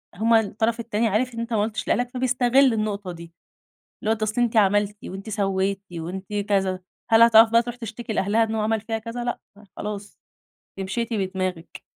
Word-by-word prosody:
هُم 225 +4 +2
الطرف 225 +1 +1
التاني 225 0 0
عارف 235 +5 0
إن 230 - -6
أنت 230 0 -4
ما 210 - +2
قُلتش 215 +1 -3
لأهلك 245 0 +1
فبيستغل 255 0 +3
النقطة 205 -3 -2
دي، 170 -1 -11 0.7
اللي 215 - 0
هو - - -11
أصل 215 +3 0
أنت 230 -1 0
عملتِ 205 0 +3
وأنتِ 195 +3 -7
سوّيتِ 195 -1 0
وأنتِ 175 +3 -6 0.2
كذا، 190 -2 +1 0.3
هل 225 0 +7
هتعرف 225 -1 +7
بقى 230 +1 +5
تروح 240 +1 -6
تشتكي 230 -1 -6
لأهلها 210 +3 +2
إن 225 0 -3
هو 220 - 0
عمل 220 +1 0
فيها 225 +1 -3
كذا؟ 230 +2 -6
لأ 240 - -3 0.4
خلاص 205 -1 -6 0.6
ل - - -4
أنتِ - - -3
مشيتِ 235 +3 -2
بدماغِك. 185 -4 -3
220 Hz, 190 wpm, -24 LUFS, 195-230 Hz, 0.7 s, هل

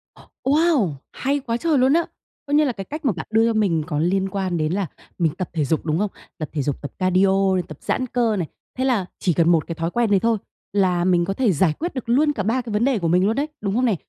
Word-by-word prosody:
Ồ, - - -17 0.2
Wow! 285 - +3 0.2
Hay 280 +2 -1
quá 235 -4 -2
trời 315 +3 +1
luôn 260 +2 +4
á! 335 +1 +3 0.4
Coi 285 - 0
như 305 - +5
là 270 - +1
cái 195 -4 -7
cách 305 +5 -7
mà 260 - +4
bạn 160 - -6
đưa 225 +1 +4
cho 230 - +1
mình 190 -8 +1
có 150 -4 -2
liên 190 +4 +1
quan 190 -2 -2
đến 155 0 0
là 195 -1 -1 0.3
mình 165 -4 +1
tập 185 - -3
thể 155 -4 0
dục, 155 +3 -1
đúng 155 -1 0
không? 205 -1 0 0.3
Tập 155 -3 -5
thể 150 - -1
dục, 140 0 -2
tập 145 - -6
cardio, 190 0 +3
tập 155 - -9
giãn 255 - -1
cơ 235 -3 +1
này, 175 -5 -2 0.3
thế 260 - 0
là 240 -8 +1
chỉ 180 - +1
cần 165 +1 +3
một 165 -3 +3
cái 165 - -4
thói 165 +1 -2
quen 235 -1 +1
đấy 200 - +5
thôi, 230 +2 +2 0.4
là 185 -3 +2
mình 175 -2 +3
có 195 - -1
thể 235 0 +2
giải 165 -1 +2
quyết 345 +2 -3
được 255 -3 -6
luôn 295 +5 +4
cả 205 - -2
3 230 +6 +1
cái 235 -3 -7
vấn 210 +3 +2
đề 265 -5 +2
của 170 - -1
mình 180 +3 +3
luôn 220 +3 +1
đấy, 285 +2 0
đúng 200 -1 -1
không 250 +2 +2
nè? 225 -5 +2
195 Hz, 285 wpm, -22 LUFS, 175-250 Hz, 0.4 s, như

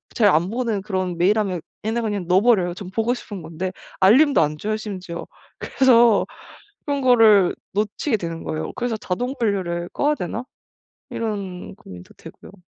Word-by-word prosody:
잘 215 -3 +4
안보는 205 +6 0
그런 185 -4 -3
메일함에 195 -1 +1 0.2
얘네 225 +2 -1
그냥 205 -5 -3
넣어 185 +1 +5
버려요. 195 -8 +3
전 180 0 -8
보고 225 +5 0
싶은 205 -7 -8
건데. 170 +4 -4 0.3
알림도 265 +10 +5
안 150 0 0
줘요 215 +6 -2
심지어. 185 -5 -7 0.3
그래서 240 -5 +4 0.6
그런 285 -1 -1
거를 225 -7 +5 0.2
놓치게 215 +4 -1
되는 165 -2 -6
거예요. 155 0 -4
그래서 240 -2 -2
'자동 245 +7 -3
분류를 180 -6 -1
꺼야 295 +1 +1
되나?' 225 - -4 0.7
이런 200 -5 -5
고민도 90 - -13
되고요. - - -13
205 Hz, 330 characters per minute, -22 LUFS, 180-230 Hz, 0.7 s, 넣어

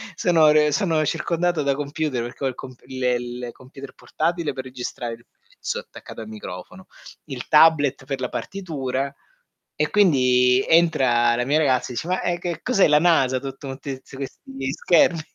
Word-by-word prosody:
sono 165 -3 +4
re 150 0 +4
sono 160 -1 +1
circondato 170 +1 0
da 140 -1 +1
computer 145 -2 -2
perché 120 +3 -6
ho - - +3
il 130 - -4
comp 130 -2 -11
il 130 -1 -6
il 125 0 -2
computer 135 +1 -12
portatile 160 +4 -2
per 130 - -6
registrare 125 -2 -6
il 115 - -23
pezzo - - -7
attaccato - - -11
al 110 - -8
microfono, 110 - -9 0.4
il 135 -5 -7
tablet 150 -4 +4
per 135 0 -4
la - - -2
partitura 140 -8 -4 0.6
e - - 0
quindi 125 -9 +4
entra 130 -8 +3
la 120 +1 -1
mia 145 +4 +2
ragazza 130 -4 +1
dice: 140 - -4
"Ma, 185 +1 0
ehm, 175 -1 0
che 170 -2 -4
cos'è 235 -7 +3
la 150 0 +5
NASA? 135 -7 +3
Tutto 135 +1 -8
motti 135 0 -6
zi - - -14
questi 135 0 -6
schermi?" 170 0 +3
135 Hz, 170 wpm, -23 LUFS, 125-160 Hz, 0.6 s, la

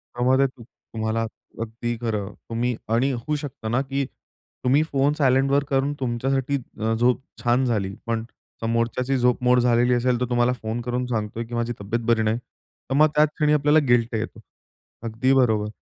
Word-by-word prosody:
त्यामध्ये 130 +3 +3
तुम 130 -2 -14
तुम्हाला, 110 0 -4 0.4
अगदी 115 +1 -3
खरं. 105 -3 -2 0.2
तुम्ही 120 +1 -1 0.2
आणि 130 +4 +2
होऊ 130 +5 -2
शकतं 140 -6 -5
ना, 120 +3 +2
की 135 0 -2 0.6
तुम्ही 135 +4 +4
फोन 140 +1 +2
सायलेंटवर 135 0 +3
करून 140 +1 +1
तुमच्यासाठी 135 +3 0 0.2
अ, 110 +1 +1
झोप 120 +3 +2 0.2
छान 125 +2 +3
झाली. 100 -5 -1
पण 115 -1 -1 0.4
समोरच्याची 115 +3 0
झोप 125 0 +2
मोड 125 0 +5
झालेली 120 0 +3
असेल 120 0 +1
तर - - +2
तुम्हाला 120 +1 +2
फोन 110 +2 -3
करून 125 +1 -2
सांगतोय, 110 -1 -2
की 120 - -11
माझी 120 +1 -1
तब्येत 115 +4 -2
बरी 115 -2 +3
नाही, 110 +2 +1
तर 130 +1 -12
मग 155 +2 +6
त्याच 150 0 +5
क्षणी 150 -1 +2
आपल्याला 150 +1 +4
गिल्ट 120 -1 +3
येतो. 110 +1 -4 0.7
अगदी 115 +4 +1
बरोबर. 110 -5 +2
120 Hz, 170 wpm, -24 LUFS, 115-135 Hz, 0.7 s, मग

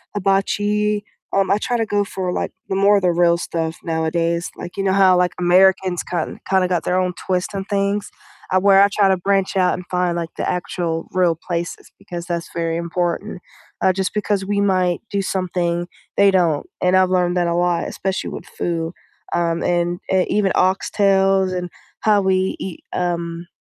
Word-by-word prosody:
hibachi, 205 +2 +1 0.3
um, 195 0 +2
I 200 - +4
try 240 +2 -1
to 225 - 0
go 205 -1 +1
for, 185 -2 -3
like, - - -2 0.2
the 190 - -1
more 200 +1 +4
the 180 -1 +3
real 170 0 +3
stuff 165 -1 -3
nowadays, 165 +1 -1
like, 175 - -8
you 195 - -1
know 190 -1 +2
how, 190 -2 +5
like, 180 0 +2
Americans 185 0 +3
ki 180 - -6 0.3
kind 190 -1 +3
of 180 - 0
got 175 -2 0
their 180 - 0
own 180 -1 0
twist 185 +2 -1
on 195 - -2
things? 200 0 -1 0.4
Uh, 185 - +3
where 195 0 +6
I 200 - +7
try 200 -1 +3
to 190 - +3
branch 195 +1 0
out 180 -1 +3
and 180 - -5
find, 180 -1 +1
like, 165 -1 -3
the - - -1
actual 170 -2 -3
real 180 -3 +2
places 170 0 -5
because 175 -1 -7
that's 170 -1 -3
very 165 -1 -1
important, 175 +3 -2 0.4
uh, 190 - +4
just 190 0 -2
because 205 -2 -1
we 200 0 0
might 185 -3 +1
do 200 -1 0
something 175 -2 -1 0.3
they 200 -1 +5
don't, 170 -6 +2 0.2
and 180 +1 +3
I've 185 -1 +4
learned 180 -1 +1
that 175 -1 +1
a 170 - 0
lot, 175 -1 +1
especially 190 0 -3
with - - -8
food, 165 -1 -3 0.4
um, 170 -1 0
and, 175 0 0
uh, 185 -1 +4
even 200 -2 +1
oxtails 195 0 +2
and 180 -1 -3 0.3
how 210 -2 +3
we 190 0 +1
eat, 185 -3 -7
um, 170 -1 -2
185 Hz, 190 wpm, -20 LUFS, 175-195 Hz, 0.4 s, I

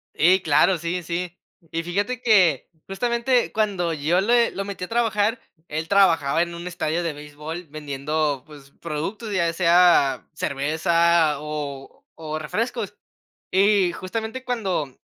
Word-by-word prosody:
Ey, 185 +4 +4
claro, 160 +4 +3
sí, 170 +2 -3
sí. 175 +2 -4 0.3
Y 165 +1 -2
fíjate 205 +8 -2
que, 185 - +4 0.2
justamente 235 +4 0
cuando 195 -6 0
yo 160 +4 +1
le 235 +4 +3
lo 195 - -4
metí 195 -2 -6
a - - -3
trabajar, 225 0 +1 0.3
él 155 +2 -4
trabajaba 165 -7 +3
en 170 0 -2
un 170 +1 -7
estadio 170 -1 -2
de 165 -2 -2
béisbol 150 +4 -8
vendiendo, 145 -1 -2
pues, 145 -2 -15
productos, 170 +8 -4
ya 170 -3 +1
sea 170 -6 +4
cerveza 160 +2 +2
o 145 -2 -6 0.2
o 155 0 -3
refrescos, 220 +7 -3 0.6
y 195 -1 +3
justamente 220 +8 -5
cuando, 190 - -2
170 Hz, 135 wpm, -23 LUFS, 155-200 Hz, 0.6 s, Ey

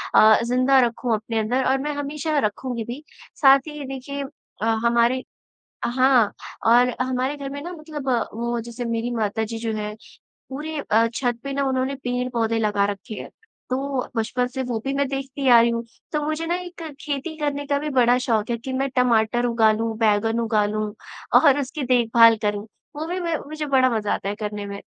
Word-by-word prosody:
अ, 215 0 +7
ज़िंदा 255 +3 +3
रखूँ 235 0 -2
अपने 225 +1 -3
अंदर 245 +5 0
और 265 - +3
मैं 295 0 -2
हमेशा 295 +2 -2
रखूँगी 235 +1 -2
भी। 245 +7 -7 0.4
साथ 275 -1 +8
ही 300 -1 -7
ये 285 - -5
देखिए 270 +1 -5 0.4
हमारे 235 +3 +2 0.6
हाँ, 250 -3 +3 0.3
और 245 +2 +5
हमारे 255 +2 -1
घर 280 -1 -6
में 285 +1 -6
ना 350 - -6
मतलब 310 -4 -7 0.3
वो 235 +1 -2
जैसे 235 +1 -6
मेरी 230 +1 -2
माता 220 -1 -1
जी 225 +1 -5
जो 225 0 -2
हैं 210 0 -4 0.6
पूरे 300 +3 -5
अ, 225 +2 +5
छत 240 -1 -1
पे 275 - -4
ना 280 0 0
उन्होंने 260 +1 0
पेड़-पौधे 245 -3 -1
लगा 205 -2 +2
रखे 205 +3 -8
है। - - -10 0.4
तो 265 0 -2
बचपन 245 +2 0
से 260 +1 -4
वो 240 -3 -2
भी 275 - -1
मैं 280 0 +1
देखती 270 0 -4
आ 235 - +9
रही 235 - +3
हूँ। 230 0 -2 0.3
तो 300 - 0
मुझे 310 +2 -2
ना 345 - +1
एक 360 -1 -7 0.2
खेती 295 +2 -4
करने 285 -1 -2
का 285 -1 +1
भी 300 - -3
बड़ा 250 -3 +4
शौक 220 -3 +1
है 235 - 0
कि 260 +3 -6
मैं 270 +1 0
टमाटर 240 -1 +2
उगा 230 -2 +4
लूँ, 225 +1 -2
बैंगन 225 +1 +2
उगा 220 -2 +2
लूँ 210 0 -2 0.5
और 285 -1 +5
उसकी 285 +2 -4
देखभाल 235 -2 +5
करूँ। 210 0 -1 0.3
वो 310 +2 -4
भी 360 +2 -2
मैं 335 -3 -1
मुझे 310 0 -4
बड़ा 265 -2 +4
मज़ा 210 -1 -1
आता 195 - -3
है 205 - -3
करने 210 -1 -5
में। 200 0 -7
250 Hz, 195 wpm, -23 LUFS, 225-275 Hz, 0.6 s, आ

